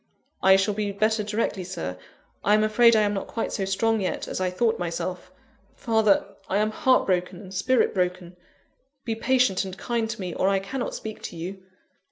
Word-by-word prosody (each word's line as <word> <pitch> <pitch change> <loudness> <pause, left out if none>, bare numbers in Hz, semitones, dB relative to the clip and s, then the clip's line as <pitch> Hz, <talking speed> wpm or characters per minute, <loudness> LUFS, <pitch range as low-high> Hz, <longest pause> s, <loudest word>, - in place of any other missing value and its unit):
"I 190 0 +7
shall 195 +2 +2
be 205 0 -2
better 215 +2 +1
directly, 210 -2 -2
Sir. 175 - -5 0.5
I 210 - +4
am 215 - +3
afraid 230 +2 +5
I 215 - +4
am 205 0 +1
not 195 - -3
quite 230 - -3
so 195 - -1
strong 220 +3 +1
yet 185 - -2
as - - -4
I 185 - +1
thought 225 +5 0
myself. 180 +1 -4 0.4
Father! 220 -3 +2 0.2
I 190 - +1
am 215 +1 +1
heart 260 +2 +3
broken 180 -1 -1
and 190 -2 -11
spirit 245 +6 +2
broken: 180 -2 -2 0.7
be 230 - -1
patient 245 -4 +2
and 190 -1 -7
kind 230 +2 -2
to - - -5
me, 180 -3 -4
or 190 - +1
I 195 - +2
cannot 220 +7 -4
speak 220 -1 -7
to - - -7
you." 185 +4 -6
200 Hz, 200 wpm, -25 LUFS, 185-220 Hz, 0.7 s, I